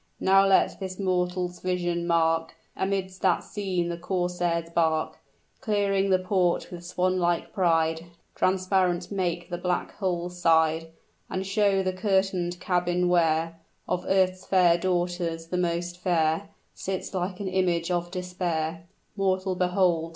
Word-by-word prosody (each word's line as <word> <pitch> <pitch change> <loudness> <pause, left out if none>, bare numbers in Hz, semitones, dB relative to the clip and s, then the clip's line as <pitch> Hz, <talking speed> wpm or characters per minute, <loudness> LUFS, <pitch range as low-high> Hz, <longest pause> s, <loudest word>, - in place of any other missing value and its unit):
Now 195 +1 +5
let 195 - +3
this 185 -1 -5
mortal's 180 -1 -1
vision 175 -1 -1
mark 165 -1 +1 0.2
Amidst 190 -1 -2
that 185 -3 +2
scene 185 -4 -2
the 170 0 -4
corsair's 175 -2 -1
bark, 160 -2 0 0.4
Clearing 200 -4 +1
the 185 - +5
port 185 -1 0
with 175 -1 -8
swan 185 +1 0
like 175 -1 0
pride; 165 -2 +1 0.3
Transparent 185 -1 +1
make 175 -2 -2
the 175 - -3
black 180 0 -1
hull's 180 -2 -2
side, 160 -1 +3 0.4
And 190 +1 -3
show 195 -1 +2
the 185 0 -1
curtain'd 185 -2 0
cabin, 180 -1 +1
where 165 -1 +2 0.3
Of 180 - -1
earth's 185 -1 +2
fair 180 -3 +5
daughters 175 -2 -1
the 180 - -1
most 175 0 -1
fair 170 +1 +1 0.2
Sits 190 0 -4
like 185 0 -3
an 200 - -3
image 180 -2 0
of 175 -1 -1
despair, 175 -2 -3 0.3
Mortal, 190 -1 0
behold! 180 -2 +1
180 Hz, 135 wpm, -26 LUFS, 170-190 Hz, 0.4 s, Now